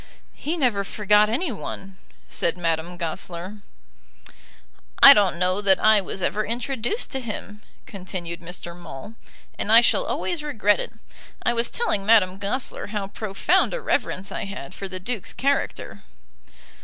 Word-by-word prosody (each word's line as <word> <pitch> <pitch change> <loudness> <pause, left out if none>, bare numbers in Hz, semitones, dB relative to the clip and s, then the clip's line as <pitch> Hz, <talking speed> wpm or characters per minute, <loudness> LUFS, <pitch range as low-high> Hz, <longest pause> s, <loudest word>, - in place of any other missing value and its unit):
"He 325 +4 -4
never 240 -9 +1
forgot 210 +1 +3
any 270 +7 0
one," 195 -2 -7 0.3
said 170 +1 -1
Madame 170 0 -2
Goesler. 175 +3 -5 1.4
"I - - +12
don't 200 -4 +2
know 185 +3 +1
that 195 -2 +4
I 215 -1 +5
was 190 0 -6
ever 215 - 0
introduced 240 - -2
to 265 - -3
him," 210 -3 -7 0.2
continued 180 -3 -6
Mr. 175 0 -7
Maule, 170 +2 -10 0.5
"and 210 - 0
I 230 +1 +9
shall 240 - +3
always 345 -3 -2
regret 220 -9 +1
it. - - -4 0.5
I 240 - +2
was 235 0 0
telling 215 - -1
Madame 195 -3 +4
Goesler 210 +6 -3
how 205 -2 -4
profound 215 - +1
a - - -3
reverence 195 - -2
I - - -4
had 195 -5 -8
for 195 - -6
the 185 -1 -6
Duke's 215 +1 -4
character." 280 +1 -2
205 Hz, 150 wpm, -24 LUFS, 185-235 Hz, 1.4 s, I